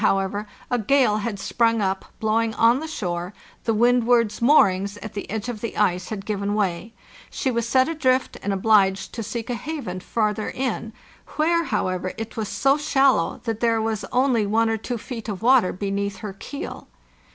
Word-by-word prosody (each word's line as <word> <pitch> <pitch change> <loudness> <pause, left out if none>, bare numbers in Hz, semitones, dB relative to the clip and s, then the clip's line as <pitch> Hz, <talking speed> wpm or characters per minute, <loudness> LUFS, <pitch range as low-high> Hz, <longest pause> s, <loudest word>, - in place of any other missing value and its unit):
NORTH - - +4
however, 195 +2 -1 0.2
a 245 - +2
gale 230 -1 +3
had 215 0 -3
sprung 230 +2 +1
up, 190 -1 -1
blowing 220 +1 +1
on 235 +3 +4
the 320 - -5
shore, 180 - -4 0.3
the 225 - +2
Windward's 235 -1 +3
moorings 200 -7 +4
at 215 0 -8
the 200 - -6
edge 220 +1 -3
of 230 -4 -5
the 230 - -5
ice 180 -3 +1
had 205 -3 -5
given 205 -1 -2
way, 200 +1 -1 0.4
she 265 - -1
was 235 -1 -1
set 260 +1 +4
adrift 265 -5 +1
and 200 - -2
obliged 195 -1 +2
to 230 - -4
seek 225 +1 -5
a 245 - -2
haven 240 - -5
farther 215 +2 -1
in, 250 -3 -3 0.5
where, 335 +2 +2
however, 185 -7 -1
it 225 0 -6
was 220 -2 -3
so 275 +2 +2
shallow 270 - +2
that 225 -2 -3
there 230 -1 +2
was 220 -2 -2
only 250 -3 +2
one 225 +2 +2
or 225 - 0
two 240 +3 -4
feet 230 0 -7
of 205 0 -5
water 245 -6 +5
beneath 200 +1 -3
her 195 +1 -6
keel. 280 +8 -7
220 Hz, 185 wpm, -23 LUFS, 200-245 Hz, 0.5 s, water